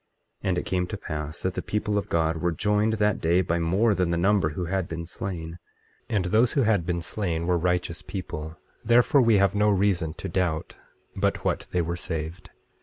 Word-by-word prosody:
24:26 -, -, 0 dB
And 90 Hz, -, +1 dB
it -, -, -2 dB
came 90 Hz, -1 st, 0 dB
to 105 Hz, -, -5 dB
pass 75 Hz, -3 st, -5 dB
that 95 Hz, -, -1 dB
the -, -, -3 dB
people 105 Hz, 0 st, -2 dB
of 100 Hz, -, -1 dB
God 80 Hz, 0 st, +1 dB
were 85 Hz, +2 st, 0 dB
joined 105 Hz, +5 st, +1 dB
that 105 Hz, -1 st, +1 dB
day 85 Hz, +3 st, +3 dB
by 85 Hz, 0 st, 0 dB
more 95 Hz, +7 st, +2 dB
than 90 Hz, -3 st, 0 dB
the 85 Hz, -, 0 dB
number 95 Hz, -2 st, +3 dB
who 85 Hz, +4 st, -4 dB
had 95 Hz, 0 st, -1 dB
been 85 Hz, 0 st, -5 dB
slain; 85 Hz, -1 st, -6 dB, 0.5 s
and 105 Hz, -6 st, 0 dB
those 110 Hz, +6 st, +3 dB
who 140 Hz, -, +3 dB
had 105 Hz, -6 st, +2 dB
been 85 Hz, -1 st, -1 dB
slain 85 Hz, -4 st, -2 dB
were 90 Hz, 0 st, +2 dB
righteous 90 Hz, -1 st, 0 dB
people, 80 Hz, -4 st, -6 dB, 0.3 s
therefore 120 Hz, +5 st, +5 dB
we 115 Hz, -3 st, +4 dB
have 100 Hz, 0 st, +3 dB
no 105 Hz, +1 st, +3 dB
reason 95 Hz, -5 st, +1 dB
to 95 Hz, -, -6 dB
doubt 85 Hz, -3 st, -1 dB, 0.4 s
but -, -, 0 dB
what -, -, -1 dB
they 90 Hz, -1 st, +1 dB
were 85 Hz, +2 st, -3 dB
saved. 80 Hz, +2 st, -5 dB
90 Hz, 210 wpm, -26 LUFS, 85-105 Hz, 0.5 s, therefore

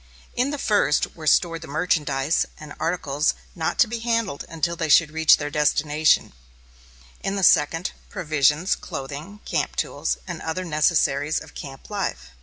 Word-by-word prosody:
In 250 Hz, +3 st, 0 dB
the 290 Hz, -, -3 dB
first 205 Hz, -, +1 dB
were 155 Hz, -2 st, -8 dB
stored 165 Hz, 0 st, +3 dB
the 160 Hz, -, -9 dB
merchandise 150 Hz, -2 st, 0 dB
and 150 Hz, -1 st, -9 dB
articles 155 Hz, -3 st, 0 dB, 0.2 s
not 160 Hz, -2 st, -2 dB
to 255 Hz, -, +5 dB
be 230 Hz, +1 st, -4 dB
handled 230 Hz, -9 st, -1 dB
until 165 Hz, +1 st, -1 dB
they 165 Hz, -2 st, -3 dB
should 150 Hz, +1 st, +5 dB
reach 160 Hz, 0 st, +5 dB
their 145 Hz, -1 st, -4 dB
destination; 150 Hz, -, +2 dB, 0.9 s
in 195 Hz, -, -3 dB
the 195 Hz, -, -2 dB
second, 165 Hz, +2 st, +3 dB, 0.2 s
provisions, 155 Hz, -2 st, +1 dB
clothing, 145 Hz, +10 st, -7 dB
camp -, -, -1 dB
tools, -, -, -1 dB
and -, -, -6 dB
other 165 Hz, +3 st, -3 dB
necessaries 150 Hz, -2 st, +1 dB
of -, -, -13 dB
camp 135 Hz, +6 st, -10 dB
life. 65 Hz, -, -3 dB
160 Hz, 155 wpm, -23 LUFS, 150-180 Hz, 0.9 s, to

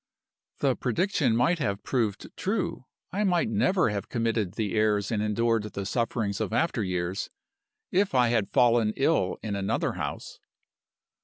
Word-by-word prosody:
"The -, -, +3 dB
prediction 135 Hz, -, +1 dB
might 135 Hz, +9 st, +2 dB
have 100 Hz, -8 st, -2 dB
proved 110 Hz, -6 st, -2 dB
true 195 Hz, -, -2 dB, 0.3 s
I 200 Hz, +4 st, 0 dB
might 190 Hz, +3 st, +2 dB
never 195 Hz, -, +2 dB
have 100 Hz, -1 st, -4 dB
committed 115 Hz, -5 st, -1 dB
the 110 Hz, -3 st, -2 dB
errors 105 Hz, -2 st, +1 dB
and 105 Hz, -2 st, 0 dB
endured 115 Hz, +2 st, +1 dB
the 100 Hz, -2 st, -5 dB
sufferings 110 Hz, -2 st, -1 dB
of -, -, -2 dB
after 120 Hz, -1 st, +1 dB
years 90 Hz, 0 st, -2 dB, 0.6 s
if 195 Hz, -5 st, +1 dB
I 125 Hz, -2 st, +4 dB
had 115 Hz, -4 st, +1 dB
fallen 115 Hz, -3 st, +3 dB
ill 135 Hz, -, +1 dB
in 105 Hz, -2 st, -2 dB
another 100 Hz, 0 st, 0 dB
house. -, -, -6 dB
115 Hz, 150 wpm, -27 LUFS, 105-135 Hz, 0.6 s, I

